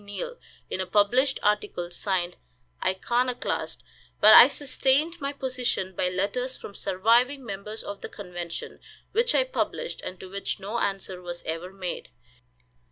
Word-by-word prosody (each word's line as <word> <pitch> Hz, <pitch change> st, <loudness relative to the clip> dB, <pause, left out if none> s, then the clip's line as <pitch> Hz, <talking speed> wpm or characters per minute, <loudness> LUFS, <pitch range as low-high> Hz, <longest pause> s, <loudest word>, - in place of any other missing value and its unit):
Neill, 485 Hz, -, -6 dB, 0.3 s
in 190 Hz, -, -3 dB
a 185 Hz, -, -3 dB
published 245 Hz, +8 st, +3 dB
article, 205 Hz, -4 st, 0 dB
signed 180 Hz, -1 st, -1 dB, 0.5 s
"Iconoclast;" 240 Hz, +7 st, -1 dB, 0.4 s
but -, -, +9 dB
I -, -, +12 dB
sustained 290 Hz, +4 st, +1 dB
my 275 Hz, 0 st, -1 dB
position 250 Hz, -8 st, -2 dB
by 180 Hz, -, +1 dB
letters 205 Hz, +8 st, -1 dB
from 200 Hz, -, -9 dB
surviving 240 Hz, +9 st, +2 dB
members 210 Hz, +1 st, -5 dB
of 200 Hz, 0 st, -7 dB
the -, -, -6 dB
convention, 175 Hz, -4 st, -6 dB, 0.3 s
which 470 Hz, +3 st, +2 dB
I -, -, +5 dB
published, -, -, -3 dB
and 185 Hz, -, -7 dB
to 190 Hz, -, -8 dB
which 200 Hz, +1 st, -3 dB
no 205 Hz, +4 st, -3 dB
answer 195 Hz, -3 st, -2 dB
was 175 Hz, -1 st, -6 dB
ever 165 Hz, +3 st, -4 dB
made. 190 Hz, -2 st, -5 dB
205 Hz, 145 wpm, -27 LUFS, 185-255 Hz, 0.5 s, I